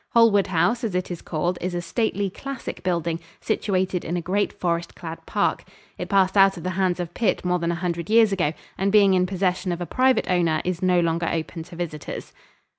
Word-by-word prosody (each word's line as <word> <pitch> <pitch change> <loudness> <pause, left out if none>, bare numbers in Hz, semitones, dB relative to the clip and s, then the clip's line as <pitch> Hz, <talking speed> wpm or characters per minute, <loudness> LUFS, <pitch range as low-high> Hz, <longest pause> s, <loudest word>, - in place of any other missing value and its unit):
Holwood 225 -4 +5
House, 190 +8 +1
as 215 -5 -2
it 180 0 -2
is 175 - -5
called, 175 +2 -2
is 180 0 -2
a - - 0
stately, 205 0 -1
classic 275 +4 -6
building, 170 -2 -1 0.2
situated 190 -4 -1
in 175 - -2
a - - 0
great 190 +4 0
forest 170 -1 -2
clad 165 -1 -8
park. - - 0 0.3
It - - -6
passed 190 -1 +3
out 195 -1 +5
of 165 - -8
the 185 - -2
hands 185 -1 0
of 175 -1 -4
Pitt 225 -5 0
more 180 0 +1
than 170 0 0
a - - -1
hundred 170 -1 -3
years 225 -1 +5
ago, 170 -6 +1 0.3
and 195 +1 +1
being 200 -2 +6
in 185 -1 +3
possession 185 -1 -1
of 175 - -3
a 175 - -3
private 255 +7 +2
owner, 170 -4 +2
is 180 -1 -2
no 180 -1 +3
longer 170 0 0
open 165 +1 -3
to 180 - -12
visitors. 160 -4 -6
180 Hz, 215 wpm, -24 LUFS, 170-195 Hz, 0.3 s, being